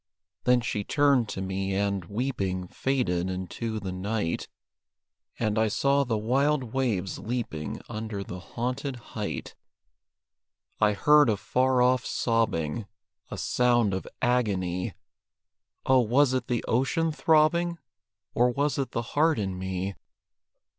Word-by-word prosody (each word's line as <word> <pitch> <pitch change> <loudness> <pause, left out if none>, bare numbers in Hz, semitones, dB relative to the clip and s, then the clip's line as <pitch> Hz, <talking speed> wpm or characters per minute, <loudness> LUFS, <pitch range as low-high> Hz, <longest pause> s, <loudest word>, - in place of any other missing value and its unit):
Then 125 -1 +4
she 105 -3 -2
turned 140 -3 +3
to 95 - -4
me 95 0 -2
and, 100 -2 0
weeping, 100 -4 -2
Faded 95 -8 0
into 95 +5 -4
the 95 -2 -5
night; 95 -1 -2 0.9
And 110 -1 0
I 110 - +3
saw 140 +6 +2
the 120 -4 -1
wild 130 +3 +1
waves 110 -9 -1
leaping 95 - -4
Under 110 -3 -4
the 90 -1 -7
haunted 125 +7 -3 0.2
height. 105 -2 -4 1.3
I 105 0 +4
heard 150 +5 +5
a 105 - +2
far 125 +3 +2
off 125 0 +3
sobbing, 115 -4 0 0.4
A - - -6
sound 120 -4 +2
of 95 - -3 0.2
agony 95 -8 0 0.9
Oh, 130 0 +5
was 125 +3 +3
it 130 -2 -1
the 120 -2 -1
ocean 160 +7 +1
throbbing? 165 +3 +3 0.6
Or 125 +1 +4
was 140 +3 0
it 135 -3 -2
the 115 - -1
heart 160 +2 +3
in 95 -3 -2
me? 95 +1 -3
115 Hz, 130 wpm, -27 LUFS, 95-130 Hz, 1.3 s, heard